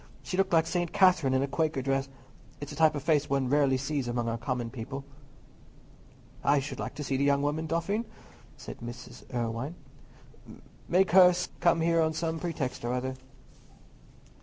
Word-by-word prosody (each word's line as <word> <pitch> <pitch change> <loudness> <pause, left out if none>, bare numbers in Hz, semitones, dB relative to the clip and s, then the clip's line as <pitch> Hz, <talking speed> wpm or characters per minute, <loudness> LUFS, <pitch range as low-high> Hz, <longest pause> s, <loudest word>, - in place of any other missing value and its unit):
She - - -4
looked 195 +1 +1
like 165 -1 +4
St. 175 0 -1
Catherine 165 -9 +4
in 130 - +2
a - - -1
Quaker 150 -2 -1
dress. 135 0 0 0.5
It's 145 - -7
a - - -7
type 160 -1 +4
of 145 - -4
face 150 -3 +2
one 135 -2 0
rarely 140 -2 +3
sees 140 -1 -2
among 120 -1 -1
our 115 - -2
common 120 -1 -3
people." 135 +2 -6 1.4
"I 145 +1 +4
should 135 - -6
like - - -5
to 150 - -5
see 135 -1 -1
the 140 - +1
young 140 0 +2
woman, 155 +2 -1
Dauphin," 170 +8 -1 0.5
said - - -9
Mrs. 120 +1 -9
Irwine. 120 +5 -3 1.1
"Make 185 +1 +3
her 180 -1 +8 0.3
come 170 -1 +3
here 165 0 +3
on 160 0 +1
some 160 0 -2
pretext 160 -9 -3
or 120 +1 -1
other." 130 +1 -2
145 Hz, 175 wpm, -29 LUFS, 130-165 Hz, 1.4 s, her